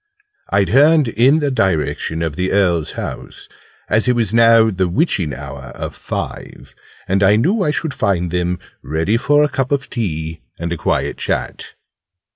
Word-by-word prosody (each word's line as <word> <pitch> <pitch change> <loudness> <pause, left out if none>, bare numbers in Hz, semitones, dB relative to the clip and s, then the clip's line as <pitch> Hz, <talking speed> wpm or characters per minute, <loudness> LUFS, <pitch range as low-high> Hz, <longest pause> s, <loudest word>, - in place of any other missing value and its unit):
I 100 0 +3
turned 145 - +4
in 130 +8 +3
the 145 -1 0
direction 85 -6 -1
of 80 -3 -3
the 90 +1 -1
Earl's 90 -6 +1
house, - - -7 0.4
as 110 +4 +1
it 125 - +4
was 115 -3 -1
now 115 -1 +5
'the 95 -1 0
witching 90 - 0
hour' - - -8
of - - -5
five, - - -7 0.3
and 95 +1 +1
I 100 +1 +5
knew 180 - +1
I 155 - +1
should 150 0 -2
find 90 -5 0
them 90 0 -1 0.2
ready 80 +8 -1
for 145 +4 +3
a - - +3
cup 135 -2 -2
of 140 -1 -1
tea 80 - -4 0.2
and 85 +1 -3
a - - -2
quiet - - -1
chat. - - -4
100 Hz, 170 wpm, -18 LUFS, 85-135 Hz, 0.4 s, now